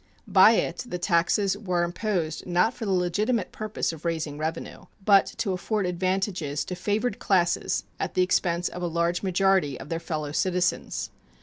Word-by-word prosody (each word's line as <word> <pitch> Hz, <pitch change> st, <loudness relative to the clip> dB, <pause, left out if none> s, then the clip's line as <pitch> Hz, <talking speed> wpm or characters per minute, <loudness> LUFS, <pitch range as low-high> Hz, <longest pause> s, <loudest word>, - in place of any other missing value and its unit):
By -, -, +7 dB
it -, -, -1 dB
the 180 Hz, -, -3 dB
taxes 180 Hz, +3 st, +2 dB
were 180 Hz, -4 st, -1 dB
imposed 175 Hz, -2 st, -2 dB
not 180 Hz, +7 st, +2 dB
for 225 Hz, -, -6 dB
the -, -, 0 dB
legitimate 190 Hz, +5 st, 0 dB
purpose 215 Hz, -5 st, -3 dB
of 160 Hz, -, -11 dB
raising 160 Hz, -3 st, -2 dB
revenue, 160 Hz, +1 st, -4 dB, 0.2 s
but 200 Hz, -2 st, +6 dB
to 200 Hz, -, -1 dB
afford 200 Hz, +3 st, -1 dB
advantages 180 Hz, -4 st, -1 dB
to 180 Hz, -, -5 dB
favored 210 Hz, +4 st, -1 dB
classes 175 Hz, -3 st, +1 dB, 0.2 s
at -, -, -3 dB
the 185 Hz, -, +4 dB
expense 180 Hz, -1 st, +1 dB
of 180 Hz, -, -6 dB
a 175 Hz, -, 0 dB
large 170 Hz, +1 st, 0 dB
majority 190 Hz, -7 st, +2 dB
of 140 Hz, -, -9 dB
their 165 Hz, -, -2 dB
fellow 155 Hz, -3 st, -4 dB
citizens. 180 Hz, +3 st, -1 dB
180 Hz, 170 wpm, -26 LUFS, 170-195 Hz, 0.2 s, By